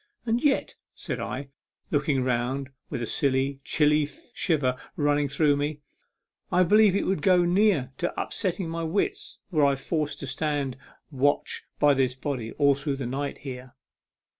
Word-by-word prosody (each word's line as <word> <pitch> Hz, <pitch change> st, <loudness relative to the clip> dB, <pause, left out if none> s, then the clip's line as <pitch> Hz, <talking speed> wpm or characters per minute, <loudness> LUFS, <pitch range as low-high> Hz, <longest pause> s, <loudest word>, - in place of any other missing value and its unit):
And 235 Hz, +1 st, 0 dB
yet," 285 Hz, -2 st, +2 dB, 0.2 s
said -, -, -4 dB
I, 135 Hz, +1 st, -4 dB, 0.4 s
looking 145 Hz, -3 st, +1 dB
round 130 Hz, +2 st, -1 dB, 0.2 s
with 120 Hz, -, -3 dB
a -, -, -1 dB
silly, 135 Hz, +2 st, 0 dB
chilly 150 Hz, 0 st, +3 dB, 0.3 s
shiver 145 Hz, -, +1 dB, 0.2 s
running 145 Hz, -3 st, +1 dB
through 145 Hz, +1 st, +3 dB
me, 145 Hz, +1 st, -2 dB, 0.4 s
" -, -, -58 dB, 0.3 s
I 180 Hz, -, +5 dB
believe 205 Hz, +1 st, +5 dB
it -, -, +1 dB
would 190 Hz, -5 st, 0 dB
go 180 Hz, -1 st, +4 dB
near 175 Hz, -7 st, +3 dB
to 175 Hz, -, -2 dB
unsettling 180 Hz, -2 st, -2 dB
my 165 Hz, 0 st, -3 dB
wits 165 Hz, +5 st, -2 dB
were 155 Hz, -4 st, +3 dB
I 140 Hz, -1 st, +4 dB
forced 150 Hz, +2 st, -2 dB
to -, -, -3 dB
stand 140 Hz, -1 st, -1 dB, 0.4 s
watch 145 Hz, +1 st, 0 dB
by 145 Hz, -1 st, +5 dB
this 130 Hz, -2 st, +1 dB
body 130 Hz, -4 st, -4 dB
all 140 Hz, -1 st, +4 dB
through 140 Hz, +1 st, -2 dB
the 135 Hz, -2 st, -4 dB
night 140 Hz, +3 st, -3 dB
here." 125 Hz, -1 st, -7 dB
145 Hz, 165 wpm, -26 LUFS, 135-165 Hz, 0.4 s, I